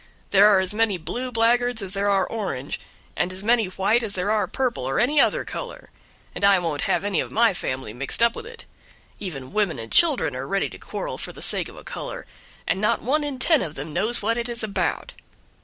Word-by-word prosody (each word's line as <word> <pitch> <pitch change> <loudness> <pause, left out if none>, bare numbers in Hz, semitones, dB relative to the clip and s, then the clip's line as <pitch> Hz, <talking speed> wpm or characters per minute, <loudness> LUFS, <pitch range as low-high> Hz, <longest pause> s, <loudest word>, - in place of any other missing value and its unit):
There 200 +1 +7
are 200 -2 +5
as 190 +1 0
many 215 -3 +1
'blue' 240 +11 -5
blackguards 240 +1 +2
as 190 0 -5
there 200 0 0
are 195 -1 +3
'orange', 185 - -4 0.4
and 175 - 0
as 185 +1 -6
many 230 0 +3
white 195 +5 +1
as 220 -3 -3
there 190 +3 -1
are 215 -1 +1
purple, 250 - -2
or 135 +1 -1
any 280 +5 +4
other - - +2
color, - - -8 0.4
and - - -6
I 200 -1 +6
won't 165 -5 -2
have - - +1
any 200 -5 0
of - - -2
my 225 -2 +4
family 130 -9 -4
mixed 140 - +1
up 235 0 +3
with 450 - -8
it. 465 0 -11 0.5
Even 140 -9 -7
women 205 -8 +1
and 115 -1 -8
children 300 - +4
are 130 +1 -5
ready 195 +4 0
to - - -12
quarrel - - -5
for - - -6
the - - -12
sake - - +2
of - - -14
a - - -11
color, - - -6 0.4
and 195 - -1
not 225 +2 +1
one 295 +5 +1
in 285 -2 -3
ten 305 +3 +3
of 155 -2 -5
them 145 +3 -6
knows 215 +7 +2
what 230 +3 +1
it 235 +1 -3
is 235 -1 0
about." 220 - -2
205 Hz, 230 wpm, -23 LUFS, 180-235 Hz, 0.5 s, There